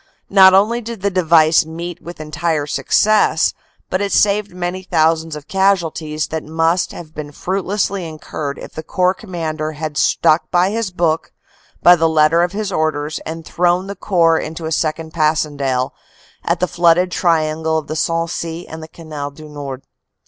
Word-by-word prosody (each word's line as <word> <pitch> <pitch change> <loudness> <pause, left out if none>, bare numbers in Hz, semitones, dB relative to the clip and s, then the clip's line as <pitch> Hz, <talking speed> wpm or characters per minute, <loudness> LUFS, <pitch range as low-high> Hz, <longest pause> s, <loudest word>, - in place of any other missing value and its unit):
Not 190 -1 +8
only 220 +5 +3
did 230 -3 -7
the 200 - +1
device 165 -3 +4
meet 170 +2 -7
with 175 -1 -10
entire 155 0 -2
success, 205 +2 +2 0.4
but 185 - 0
it 200 -1 -1
saved 205 0 +2
many 180 +1 -4
thousands 160 -2 +1
of 150 0 -10
casualties 165 -6 0
that 160 -1 -3
must 165 +2 0
have 155 -2 -10
been 150 -1 -7
fruitlessly 190 +2 -2
incurred 155 -2 -6
if - - -10
the 160 - -5
Corps 180 +3 +1
Commander 160 -6 -4
had 155 -1 -5
stuck 155 +2 +2
by 180 +2 +2
his 225 -2 -2
book 170 -3 -1 0.5
by 175 - +8
the 165 -1 +2
letter 160 +1 +4
of 175 0 +1
his 205 0 -3
orders 155 -2 -1
and 165 0 -6
thrown 175 +1 +1
the 200 +1 -6
Corps 170 -4 +2
into 160 +1 -6
a 160 - -3
second 160 0 -1
Passchendaele 145 -5 0 0.5
at - - 0
the 180 - +1
flooded 175 +1 +3
triangle 160 -2 +1
of 155 - -3
the 155 - -5
Sensee 165 +1 -2
and 160 0 -8
the 160 - -8
Canal 155 -3 -7
du 155 +2 -13
Nord. 140 -3 -7
165 Hz, 170 wpm, -18 LUFS, 155-180 Hz, 0.5 s, Not